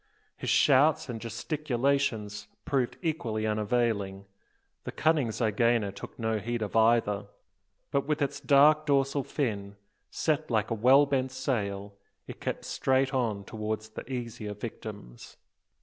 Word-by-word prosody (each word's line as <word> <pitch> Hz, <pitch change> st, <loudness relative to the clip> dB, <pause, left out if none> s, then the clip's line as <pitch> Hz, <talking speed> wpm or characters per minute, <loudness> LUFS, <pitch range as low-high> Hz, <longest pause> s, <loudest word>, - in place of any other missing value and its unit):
His -, -, -4 dB
shouts 145 Hz, +1 st, +4 dB
and 115 Hz, -2 st, -5 dB
gesticulations 120 Hz, -4 st, -1 dB, 0.2 s
proved 130 Hz, -4 st, 0 dB
equally 120 Hz, -10 st, -1 dB
unavailing. 105 Hz, -2 st, 0 dB, 0.6 s
The -, -, -5 dB
cunning 155 Hz, -5 st, +2 dB
zygaena 110 Hz, -1 st, +1 dB
took 100 Hz, +8 st, -10 dB
no 110 Hz, -2 st, -1 dB
heed 120 Hz, +2 st, -2 dB
of 105 Hz, -, -5 dB
either; 110 Hz, -3 st, +3 dB, 0.6 s
but 140 Hz, 0 st, 0 dB
with 150 Hz, -1 st, 0 dB
its 140 Hz, -2 st, -1 dB
dark 150 Hz, +2 st, +5 dB
dorsal 140 Hz, 0 st, +2 dB
fin, 100 Hz, -8 st, -3 dB, 0.3 s
set 155 Hz, -1 st, -1 dB
like 110 Hz, -1 st, 0 dB
a -, -, +3 dB
well 130 Hz, +6 st, +5 dB
bent 130 Hz, -2 st, 0 dB
sail, 100 Hz, -7 st, -2 dB, 0.3 s
it -, -, -10 dB
kept -, -, -3 dB
straight 135 Hz, +1 st, +1 dB
on 115 Hz, -6 st, 0 dB
towards 110 Hz, +1 st, -4 dB
the 110 Hz, +4 st, -9 dB
easier 115 Hz, -4 st, -5 dB
victims. 105 Hz, -, -9 dB
115 Hz, 135 wpm, -29 LUFS, 105-135 Hz, 0.6 s, dark